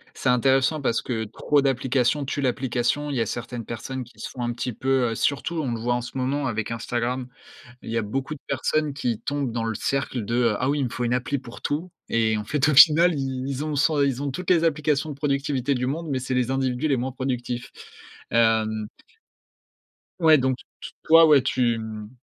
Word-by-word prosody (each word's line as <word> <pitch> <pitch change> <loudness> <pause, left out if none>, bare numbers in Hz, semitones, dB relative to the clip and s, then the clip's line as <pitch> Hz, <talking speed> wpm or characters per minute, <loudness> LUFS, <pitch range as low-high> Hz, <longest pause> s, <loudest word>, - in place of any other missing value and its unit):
C'est 130 - -1
intéressant 135 +4 +3
parce 115 -3 0
que 115 -3 -2
trop 140 +7 +1
d'applications 135 +1 +1
tuent 145 +2 -3
l'application, 130 +2 0
il 140 - -2
y 115 - +1
a - - 0
certaines 120 -1 -5
personnes 130 +3 -5
qui 120 - -19
se - - -5
font 125 - -8
un 120 0 -1
petit 125 +1 -4
peu, 130 +1 +1
heu, - - -3
surtout 145 +7 -1
on 130 -5 -2
le 115 - -3
voit 120 +2 0
en 120 - -1
ce 125 +2 -7
moment 135 +2 -1
avec 110 -1 -3
Instagram. 120 +2 -2 0.5
Il - - -8
y 115 - -2
a 115 - +1
beaucoup 135 +8 -3
de 140 - -14
personnes 145 +3 0
qui 125 -5 -2
tombent 140 -3 -2
dans 115 0 -2
le 115 0 -2
cercle 130 0 -2
de, 115 - -2
heu,: 120 -3 +2
«Ah 130 - 0
oui, 145 +1 +1
il 135 - +1
me 120 - -3
faut 125 - -3
une 120 +1 +1
appli 125 +3 -1
pour 125 -2 -12
tout» 160 +5 -2 0.2
et 110 -1 +2
en 105 - -3
fait 145 +6 +1
au 150 - +3
final, 165 +4 +7
ils 135 -2 -3
ils 140 +1 -3
ont 155 -1 -2
100 145 +2 +2
ils 135 -1 0
ont 145 - -2
toutes 180 +7 -5
les 170 -2 +4
applications 150 -2 +1
de - - -5
productivité 140 -2 -1
du 125 0 -1
monde, 160 +5 -3
mais 135 - 0
c'est 130 0 -3
les 125 0 +1
individus 130 +1 0
les 135 - +2
moins 130 +2 -3
productifs, 125 -2 -4 0.6
hem 110 -2 +2 1.3
Ouais 160 -2 +6
donc 130 -1 +1
t - - -16 0.2
t - - -9
toi 165 +1 +7
ouais 145 -3 +6
tu 120 -2 +1
mmh, 110 -1 -7
130 Hz, 230 wpm, -24 LUFS, 120-140 Hz, 1.3 s, final